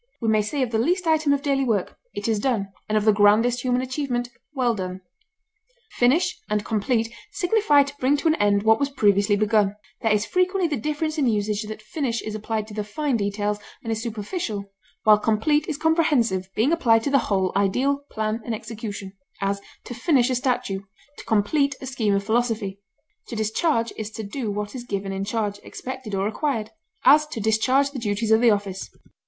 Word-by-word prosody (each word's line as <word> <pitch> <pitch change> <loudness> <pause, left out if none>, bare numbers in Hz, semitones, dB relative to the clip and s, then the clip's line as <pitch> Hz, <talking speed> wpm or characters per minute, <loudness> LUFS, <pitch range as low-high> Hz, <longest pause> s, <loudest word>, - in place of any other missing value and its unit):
We 225 - 0
may 215 -1 +4
say 260 +7 -1
of 240 - -3
the 220 - +1
least 355 +9 +1
item 310 -2 +3
of 280 0 +1
daily 275 -2 +1
work, 220 -7 -1 0.2
"It 205 - -3
is 220 -2 +1
done," 210 -5 0 0.2
and 215 - +2
of 210 - 0
the 215 - +7
grandest 215 +4 +4
human 250 0 +1
achievement, 255 -2 -2 0.2
"Well 255 -5 +1
done!" 185 -2 -5 0.9
Finish 320 +9 +2
and 210 0 0
complete 225 +1 0 0.2
signify 355 -7 +4
to 280 +1 -8
bring 270 +3 +3
to 285 - -1
an 315 - +5
end 205 -1 +2
what 220 0 +4
was 280 - +1
previously 205 -5 +3
begun; 210 -1 +2 0.3
there 225 - +2
is 210 0 +2
frequently 365 0 +1
the 290 -8 -3
difference 305 +3 -2
in 275 - +2
usage 210 -2 0
that 215 0 -7
finish 235 +1 -2
is 215 - -5
applied 215 0 -3
to - - -9
the 210 0 -2
fine 275 +6 -1
details 205 0 -1 0.2
and 225 - -3
is 220 0 -2
superficial, 215 - -4 0.3
while 215 -1 +6
complete 295 +9 +1
is 300 - -2
comprehensive, 285 - +2
being 235 +8 +2
applied 230 -9 +3
to 280 - -1
the 275 - +5
whole 190 -2 +1
ideal, 250 +9 +2
plan, 220 +1 -2
and 235 - -2
execution; 210 -3 -7 0.3
as, 200 0 -1 0.2
to - - -7
finish 255 0 +2
a - - +2
statue; 250 -6 -1 0.4
to - - -10
complete 275 +7 +2
a - - -7
scheme 225 -6 0
of 200 - 0
philosophy. 220 -3 -1 0.5
To 235 - -6
discharge 230 +3 0
is 215 -1 -4
to 220 - -5
do 220 +3 -4
what 205 0 -3
is 255 -2 -6
given 200 -4 -3
in 195 0 -3
charge, 205 -1 -2
expected, 255 -5 -6
or 195 0 0
required; 220 0 -2 0.3
as, 300 +3 +7
to 300 -6 -6
discharge 255 +6 +2
the 275 - -5
duties 215 0 -1
of 220 +1 +5
the 240 - +6
office. 200 -2 -1
225 Hz, 200 wpm, -24 LUFS, 210-275 Hz, 0.9 s, the